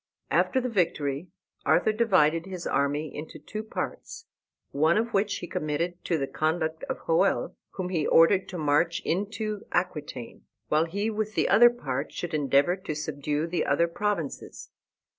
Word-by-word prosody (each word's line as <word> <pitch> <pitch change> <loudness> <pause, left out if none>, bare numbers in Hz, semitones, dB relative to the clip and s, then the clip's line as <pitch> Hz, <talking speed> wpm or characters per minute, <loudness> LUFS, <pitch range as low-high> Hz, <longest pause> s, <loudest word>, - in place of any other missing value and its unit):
After 260 - +3
the 255 - -2
victory 165 - 0 0.4
Arthur - - +3
divided 185 -7 +3
his 185 -2 -6
army 145 +1 0
into 155 +2 -7
two 215 - -6
parts, 455 - -6 0.5
one 155 +5 +3
of 230 +1 -1
which 200 +1 +1
he 175 - -6
committed 165 +4 -2
to 170 - +1
the 135 - -1
conduct 160 +2 -1
of - - -3
Hoel, 175 +4 +2 0.2
whom 185 -2 -4
he 165 -5 0
ordered 180 +3 +5
to 185 - -5
march 155 +2 +1
into 210 +3 -2
Aquitaine, 150 -9 -3 0.3
while 155 +2 +3
he 200 +6 -2
with 215 0 -3
the - - +2
other 240 +2 +7
part 145 - -4
should 175 -1 -5
endeavor 145 +3 +3
to 165 -5 -5
subdue 150 0 -2
the 170 +1 -1
other 155 +5 +2
provinces. 170 -4 -3
170 Hz, 160 wpm, -27 LUFS, 150-200 Hz, 0.5 s, other